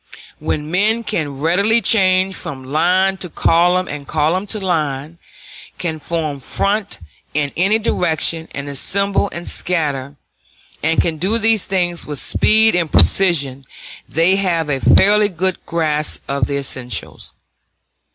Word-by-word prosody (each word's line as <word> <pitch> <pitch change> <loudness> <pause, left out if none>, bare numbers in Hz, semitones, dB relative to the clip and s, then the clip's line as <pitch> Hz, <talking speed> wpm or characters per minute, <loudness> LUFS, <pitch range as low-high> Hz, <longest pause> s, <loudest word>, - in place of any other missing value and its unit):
When 150 +1 -3
men 215 +6 +1
can 145 -9 -3
readily 200 +8 +3
change 190 -3 +3
from 135 -6 -7
line 180 +7 +1
to 180 - -6
column, 175 +3 +2
and 145 -1 -7
column 165 +6 0
to 215 - -3
line, 155 -4 -2 0.6
can 160 -3 -4
form 155 -3 -3
front 200 - -2 0.4
in 145 -2 0
any 195 +5 +2
direction, 165 -6 -1
and 140 0 -5
assemble 195 +8 0
and 170 0 -7
scatter, 145 -5 -2 0.6
and 165 - +1
can 160 -2 0
do 195 +8 +1
these 225 -2 +2
things 175 -3 -1
with 150 -1 -5
speed 220 - +4
and 170 -4 0
precision, 140 - +3 0.5
they 170 +5 +3
have 170 -6 0
a 135 - -1
fairly 205 +7 +4
good 185 0 -2
grasp 155 -2 -1
of 140 -3 -1
the 140 - -2
essentials. 125 -6 -5
170 Hz, 135 wpm, -18 LUFS, 150-190 Hz, 0.6 s, speed